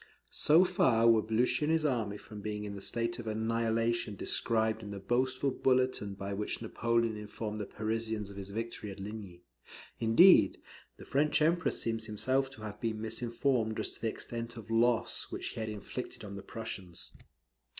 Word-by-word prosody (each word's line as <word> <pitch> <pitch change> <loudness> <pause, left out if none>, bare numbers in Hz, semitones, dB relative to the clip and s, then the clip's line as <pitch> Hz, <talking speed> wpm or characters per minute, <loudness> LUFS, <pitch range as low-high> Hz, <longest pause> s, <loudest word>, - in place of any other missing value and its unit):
So 160 +4 +5
far 120 -11 +3
were 115 -1 +6
Blucher 125 +6 +1
and 155 - +1
his 160 -1 +2
army 115 -7 0
from 105 0 -10
being 105 0 -4
in 105 -1 -5
the 100 - -7
state 115 +3 -1
of 115 - -7
annihilation 115 0 0
described 110 +2 +1
in 105 - -7
the 100 - -5
boastful 130 +6 0
bulletin 130 -7 +1
by 100 0 -4
which 105 +1 -3
Napoleon 115 0 0
informed 105 0 -5
the 105 - -4
Parisians 110 -1 -2
of - - -11
his 100 0 -6
victory 110 0 -4
at 95 - -8
Ligny. 100 -4 -8 0.6
Indeed, 115 +12 +6 0.4
the - - -11
French 145 +2 +2
Emperor 170 +3 +3
seems 115 -1 -2
himself 130 +5 +1
to 110 - -11
have 105 -1 -7
been 110 -2 -1
misinformed 115 +1 -1
as - - -2
to - - -15
the 115 - +1
extent 115 +1 -5
of 115 0 -9
loss 115 +1 +2
which - - -4
he - - -7
had 110 -1 -2
inflicted 105 0 -6
on 100 -1 -7
the 100 - -6
Prussians. 95 -7 -6
115 Hz, 180 wpm, -32 LUFS, 105-120 Hz, 0.6 s, were